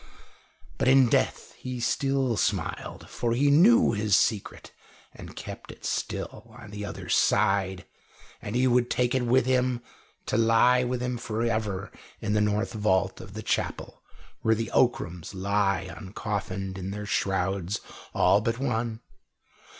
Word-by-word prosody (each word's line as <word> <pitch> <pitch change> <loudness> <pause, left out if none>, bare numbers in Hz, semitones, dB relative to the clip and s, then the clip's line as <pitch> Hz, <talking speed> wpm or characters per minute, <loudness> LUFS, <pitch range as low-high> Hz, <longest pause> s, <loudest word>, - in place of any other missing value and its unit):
But - - +1
in 130 -2 +6
death - - 0
he 125 -1 -5
still 135 0 0
smiled, 100 -5 -2
for 120 -1 -2
he 140 +4 +3
knew 225 - +6
his 105 -2 +2
secret 105 -3 -1 0.4
and - - -11
kept - - -8
it - - -13
still, - - -4
on 105 - -11
the 105 0 -6
other 100 -1 -7
side, 95 -2 +2 0.6
and 105 - -5
he 125 +1 +3
would 125 -1 +3
take 125 -1 +1
it 130 -1 +1
with 125 +1 +3
him, 125 -1 +1 0.5
to - - 0
lie 115 +2 +4
with 125 0 -2
him 125 -1 -2
for 115 -1 -3
ever 105 -4 -2 0.3
in 105 - -2
the 105 - +2
north 105 +2 0
vault 95 -3 0
of 95 +1 -11
the 110 - -6
chapel - - -3 0.4
where 110 0 +3
the 115 0 -3
Ockrams 90 -7 0
lie 95 -1 0
uncoffined 95 -1 -5
in 95 +1 -5
their 105 +1 -5
shrouds 95 -1 -1 0.4
all 100 - +4
but 115 0 -1
one. 115 -3 -2
110 Hz, 150 wpm, -27 LUFS, 100-125 Hz, 0.6 s, in